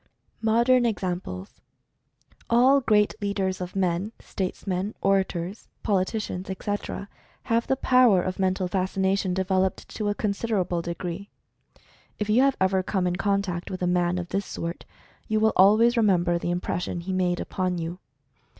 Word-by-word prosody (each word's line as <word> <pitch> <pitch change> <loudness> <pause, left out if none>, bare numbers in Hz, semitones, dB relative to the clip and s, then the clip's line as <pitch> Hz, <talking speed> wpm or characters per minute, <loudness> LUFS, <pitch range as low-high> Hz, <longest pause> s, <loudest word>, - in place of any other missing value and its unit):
MODERN 235 +3 +4
EXAMPLES. 180 - -4 0.9
All 255 +4 +5
great 210 -4 +3
leaders 195 -2 -1
of 180 +1 -6
men, 190 +3 0
statesmen, 190 +1 -3
orators, 190 0 -1 0.2
politi 195 +1 +1
cians, 190 -3 -5
etc., 200 +1 -4 0.4
have 230 0 0
the 265 - +2
power 250 -8 +4
of 185 0 -4
Mental 185 -1 +1
Fascination 190 0 0
de 190 0 0
veloped 190 0 0
to 210 -2 -2
a 205 - -1
considerable 200 -5 -1
degree. 175 +3 -5 0.9
If 210 0 -1
you 235 +4 +5
have 275 0 +3
ever 190 0 +2
come 185 0 -1
in 180 0 0
contact 195 -3 -1
with 185 -1 -4
a - - +2
man 175 0 +1
of 175 -1 -4
this 195 0 -2
sort, 170 +1 -5 0.4
you 215 0 +1
will 220 0 +3
al 195 +3 +6
ways 235 +2 +4
remember 180 -6 +2
the 175 - -3
impression 175 0 -2
he 190 +2 -4
made 180 -1 +1
upon 185 -1 -2
you. 170 +2 -5
190 Hz, 155 wpm, -25 LUFS, 180-210 Hz, 0.9 s, al